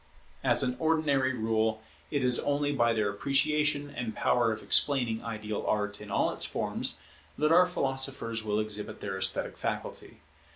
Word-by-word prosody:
As - - +4
an 125 0 -1
ordinary 155 -5 +1
rule, 110 -2 -1 0.3
it 145 -3 -1
is 125 -1 +4
only 145 0 0
by 120 -4 +2
their 105 -3 0
appreciation 145 +5 0
and 115 -3 -4
power 120 -2 +2
of 110 - -5
explaining 125 -6 +3
ideal 105 -2 -5
Art 105 -1 -1
in 105 - -10
all - - +1
its - - +1
forms - - -2 0.4
that 150 +1 +1
our 180 +2 +6
philosophers 135 -7 -2
will 105 -1 -1
exhibit 105 -1 -4
their 95 -1 -5
esthetic 95 0 +1
faculty. - - -5
120 Hz, 160 wpm, -29 LUFS, 110-140 Hz, 0.4 s, our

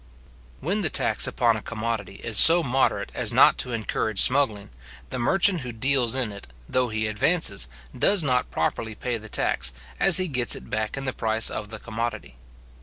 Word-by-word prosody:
When 195 +8 -2
the 165 - +1
tax - - +1
upon 120 -3 +1
a - - -7
commodity 110 -3 -5
is 115 - -2
so 170 +1 +7
moderate 125 -6 -1
as - - -2
not - - +4
to 125 - 0
encourage 110 -2 -3
smuggling, 120 - 0 0.4
the - - -4
merchant 185 +7 +2
who 125 -2 -6
deals 125 +1 +1
in 125 -5 -2
it, 100 -7 -11 0.2
though 130 -1 0
he 110 -1 -3
advances, 110 - 0 0.3
does 200 -4 +3
not 125 -3 0
properly 110 -1 -3
pay 120 +1 -4
the 110 0 -11
tax, - - 0 0.3
as 190 -3 +6
he 185 -1 0
gets 125 -6 +1
it - - -11
back 110 +3 -3
in 135 - -5
the 130 - -2
price 110 0 -1
of 105 -1 -6
the 110 - -7
commodity. 115 - -6
120 Hz, 185 wpm, -24 LUFS, 110-135 Hz, 0.4 s, so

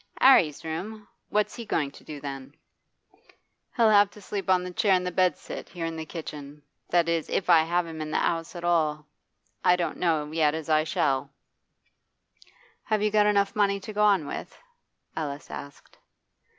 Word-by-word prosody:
''Arry's 180 - +5
room? 205 +7 -5 0.2
What's 210 0 0
he 235 - -6
going 150 -10 -1
to - - -16
do 150 -2 -8
then?' 135 0 -7 1.2
'He'll 225 -2 +5
have 205 -1 +6
to 210 - -15
sleep 200 -1 -5
on 185 -1 +4
the 180 - -6
chair 190 -1 +3
bedstead, 185 0 -1
here 170 -2 -5
in 165 0 -4
the 160 -1 -6
kitchen. 150 -3 -8 0.3
That 170 -1 +3
is, 165 -1 -1
if 180 - +1
I 165 -2 +7
have 175 +2 0
him 160 -1 -7
in 155 - -4
the - - 0
'ouse 165 +1 -1
at 170 - -7
all. 165 -3 +2
And 150 0 -22 0.6
I 180 - +5
don't 175 -1 -2
know 155 -4 0
yet 155 -1 +2
as 160 -1 -6
I 155 0 +3
shall.' 140 -3 0 1.6
'Have 215 -1 0
you 210 - +2
got 210 0 +4
enough 200 -1 +2
money 200 -1 +2
to 215 +2 -8
go 210 - -1
on 200 -7 +4
with?' - - -7 0.6
Alice 145 -2 -5
asked. 140 0 -10
170 Hz, 180 wpm, -26 LUFS, 155-200 Hz, 1.6 s, I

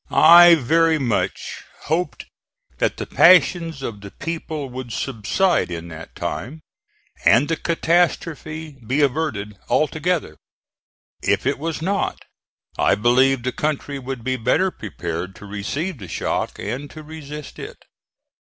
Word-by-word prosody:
I 170 +1 +8
very 160 +3 +3
much 120 -8 -2 0.2
hoped 170 +4 -2 0.5
that - - 0
the - - -4
passions 170 -5 +4
of 105 -5 -5
the 100 - -9
people 160 +1 -5
would 125 -1 -7
subside 135 - 0
in 85 -1 -6
that 80 0 -10
time, 155 +6 -5 0.6
and 120 +8 +5
the 165 - 0
catastrophe 160 -3 -1
be 130 +7 0
averted 125 -9 -1
altogether; 155 - 0 0.8
if - - +1
it 140 +1 0
was 160 0 -3
not, 195 +2 -1 0.6
I - - +4
believed 125 +4 +3
the 125 - -1
country 145 0 -2
would 130 -2 -6
be 130 +1 -1
better 130 +11 +1
prepared 90 - -6
to 105 - -12
receive 125 - -4
the 95 - -8
shock - - -2
and 140 +3 -5
to 155 - -10
resist 150 -1 -9
it. - - -8
145 Hz, 135 wpm, -21 LUFS, 115-160 Hz, 0.8 s, I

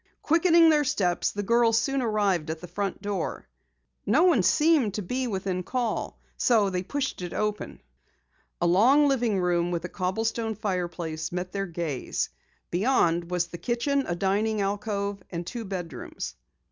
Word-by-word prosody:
Quickening 330 0 +5
their 300 -1 +3
steps, 180 -9 +1
the 205 - -4
girls 230 +1 +3
soon 270 +3 +1
arrived 205 -8 +1
at 160 0 -3
the 180 - -9
front 195 +3 -4
door. 200 -4 -3 0.6
No 270 - +3
one 340 - +5
seemed 295 - +3
to 210 - -3
be 250 +7 -2
within 190 -3 -2
call, 240 +4 -2 0.2
so 215 -5 +3
they 180 -1 -1
pushed 270 +3 -3
it 175 -1 -5
open. 210 - -3 0.8
A - - +1
long 245 +12 +5
living 240 -7 +1
room 175 -1 +1
with 170 -1 -2
a - - -5
cobblestone 220 +4 -2
fireplace 175 -5 -3
met 180 +1 -4
their 195 -1 -2
gaze. 165 -6 -3 0.4
Beyond 175 -4 +2
was 180 -1 0
the 175 -1 -9
kitchen, 265 +3 0
a 175 - -1
dining 205 +4 0
alcove, 200 0 -2
and 170 0 -5
two 230 +5 -5
bedrooms. 175 -8 -6
200 Hz, 160 wpm, -26 LUFS, 180-235 Hz, 0.8 s, Quickening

